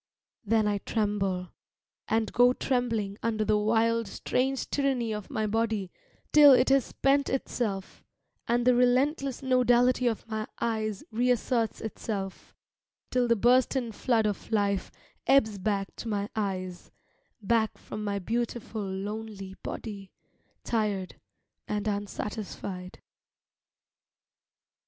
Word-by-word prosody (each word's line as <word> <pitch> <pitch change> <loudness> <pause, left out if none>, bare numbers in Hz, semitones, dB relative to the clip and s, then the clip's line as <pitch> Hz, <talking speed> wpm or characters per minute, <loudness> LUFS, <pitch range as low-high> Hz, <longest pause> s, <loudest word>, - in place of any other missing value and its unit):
Then 220 0 +2
I 205 -1 0
tremble, 195 -4 -1 0.6
and 220 0 0
go 245 +1 +5
trembling 230 -7 -1
Under 220 -2 0
the 210 0 +3
wild, 230 +1 +2
strange 260 +6 -1
tyranny 265 -5 0
of 210 -2 -6
my 220 - -1
body, 215 -3 -1 0.4
Till 290 -2 +9
it 255 +1 +4
has 270 -2 +4
spent 275 +1 +1
itself, 215 -7 -3 0.4
And 240 +1 +1
the 250 - +6
relentless 260 +3 +2
nodality 250 -1 +3
of 225 -1 -2
my 220 -1 -3
eyes 215 -3 -1
reasserts 240 0 +1
itself, 200 -3 -5 0.6
Till 250 -1 +2
the 235 - +4
bursten 245 +2 +3
flood 225 0 +1
of 210 +2 -3
life 200 -3 +1 0.4
ebbs 220 -6 +4
back 195 0 -1
to - - -6
my 205 -1 -1
eyes, 185 -4 -3 0.5
Back 220 +1 +1
from 215 - -7
my 200 -1 -1
beautiful, 230 +2 -3
lonely 200 0 -5
body 200 -4 -6 0.5
Tired 210 -5 -1 0.5
and 210 0 -2
unsatisfied. 200 -2 -5
220 Hz, 115 wpm, -28 LUFS, 205-245 Hz, 0.6 s, Till